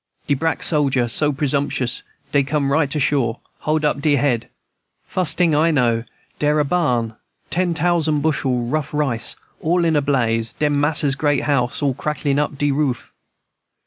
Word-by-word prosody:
"De 145 - +1
brack 160 +4 -1
sojer 135 -6 +3
so 150 +6 +2
presumptious, 140 -3 -1 0.3
dey 140 - +3
come 140 0 -1
right 145 0 +1
ashore, 135 -5 0 0.2
hold 155 0 0
up 150 -1 0
dere 145 -1 +3
head. 120 -3 0 0.6
Fus' 185 -3 0
ting 175 -3 +2
I 155 +3 +3
know, 120 -6 +1 0.3
dere 150 0 +2
was 150 - +3
a - - -5
barn, 125 -9 0 0.4
ten 175 -1 0
tousand 160 -2 +1
bushel 130 -6 0
rough 150 +3 -3
rice, 125 -6 -1 0.3
all 175 +2 +1
in 165 -1 +2
a 145 - +3
blaze, 115 -5 0
den 150 -1 0
mas'r's 145 -1 +3
great 145 0 0
house, 140 -1 0
all 140 -2 +2
cracklin' 145 0 -1
up 145 -1 -2
de 145 0 +1
roof. 135 -3 -2
145 Hz, 170 wpm, -20 LUFS, 130-155 Hz, 0.6 s, sojer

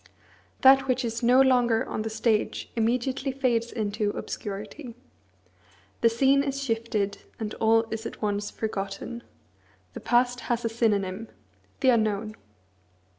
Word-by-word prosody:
That 270 0 +6
which 255 -1 0
is 230 0 -3
no 250 +2 +5
longer 245 -4 +3
on - - -4
the 225 - -3
stage 220 0 -1
immediately 250 +4 0
fades 240 -3 0
into 210 -2 -1
obscurity. 215 +6 -6 1.1
The 230 - +5
scene 270 +4 +3
is 275 0 -3
shifted, 225 -4 -1 0.2
and 215 -1 -4
all 225 0 +4
is 225 +1 -4
at - - -10
once 205 -1 -1
forgotten. 205 +2 -5 0.7
The - - -7
past 245 0 +2
has 240 -1 0
a - - +1
synonym, 215 -2 0 0.5
the 260 - +4
unknown. 215 -2 +1
230 Hz, 130 wpm, -26 LUFS, 215-250 Hz, 1.1 s, That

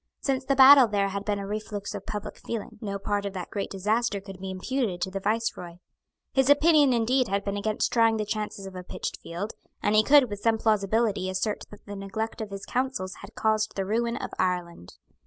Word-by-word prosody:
Since 270 -1 -1
the 275 - +2
battle 270 -1 +9
there 200 -2 0
had 200 +1 -4
been 205 -1 0
a 200 - -5
reflux 205 0 -5
of - - -7
public 210 -1 -5
feeling. 225 -1 -6
No 200 -2 -3
part 205 +1 -2
of 200 -1 -4
that 185 -2 -6
great 200 - -3
disaster 210 +2 0
could 195 -1 -11
be 190 0 -5
imputed 190 0 -2
to 190 - -1
the 195 - -3
Viceroy. 205 -4 -2 0.6
His 265 0 +3
opinion 295 -1 +5
indeed 245 +2 +2
had 200 0 -1
been 200 0 -2
against 215 +1 -1
trying 225 -1 +4
the 215 - -1
chances 210 -2 -4
of 190 - -8
a 180 - -5
pitched 180 - -5
field, 185 +6 -5 0.3
and 205 - +1
he 215 - +6
could 280 +1 +6
with 205 -2 -6
some 225 +1 +2
plausibility 215 -2 +1
assert 185 +3 -2
that 210 - -14
the 205 - -7
neglect 200 +4 -4
of 215 - -5
his 195 -1 -7
counsels 250 -7 -2
had - - -12
caused 215 0 0
the 195 - -1
ruin 235 +3 0
of - - -5
Ireland. 175 - -2
210 Hz, 215 wpm, -27 LUFS, 195-230 Hz, 0.6 s, battle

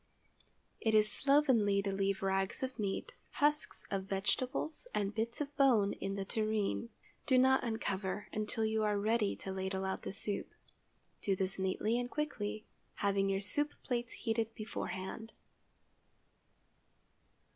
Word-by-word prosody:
It 220 -1 +2
is 215 0 +6
slovenly 260 -8 +4
to 200 - -1
leave 195 0 0
rags 195 +4 0
of 260 -2 -4
meat, 205 - -2 0.2
husks 300 +1 +1
of 195 -1 -1
vegetables 255 - -1
and 200 0 0
bits 225 +2 -1
of 290 0 -4
bone 235 -8 +5
in 195 0 -4
the 195 -1 -3
tureen. 215 +2 0 0.4
Do 260 -3 +5
not 265 +1 +5
uncover 205 -4 -2
until 215 +1 -1
you 220 0 +1
are 210 -1 +2
ready 215 0 +1
to 190 - -5
ladle 190 0 -2
out 190 - -2
the - - -4
soup. 200 +1 0 0.7
Do 195 - +1
this 190 0 -2
neatly 210 +5 +1
and 245 0 -3
quickly, 220 -8 -3 0.3
having 200 -1 +1
your 195 0 0
soup 290 +10 +2
plates 240 -2 -2
heated 225 -1 -1
beforehand. 215 0 -5
215 Hz, 140 wpm, -34 LUFS, 195-240 Hz, 0.7 s, is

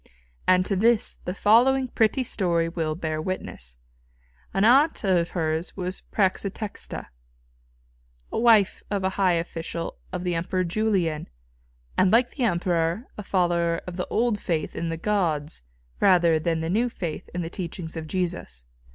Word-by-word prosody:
And 185 0 +5
to 195 - 0
this 225 +3 +2
the 180 - -2
following 255 +6 +4
pretty 235 +2 +1
story 170 -7 0
will 165 -2 -2
bear 155 -2 -3
witness. 65 - -5 0.8
An 195 - +1
aunt 275 +7 +4
of 180 -4 +2
hers 160 0 -2
was 185 0 -4
Prætextata, 200 +1 -2 1.3
wife 225 -4 +4
of 200 -2 -1
a 190 - +2
high 190 -1 +2
official 165 0 -4
of 180 -1 -4
the 180 -1 0
Emperor 180 +2 -1
Julian, 180 -4 0 0.7
and 185 - +5
like 240 +2 +4
the 260 - -1
Emperor 175 +1 0
a - - -6
follower 175 -3 +1
of 180 - -6
the 180 - -3
old 230 -2 +1
faith 165 -4 -2
in 170 - -2
the 165 - -3
gods 165 - -1 0.4
rather 175 -4 +4
than 165 0 -1
the 160 - -2
new 235 +5 +2
faith 170 -8 -5
in 175 - -1
the 165 - -4
teachings 170 -3 -6
of 160 -1 -5
Jesus. 170 - -3
180 Hz, 150 wpm, -25 LUFS, 165-205 Hz, 1.3 s, And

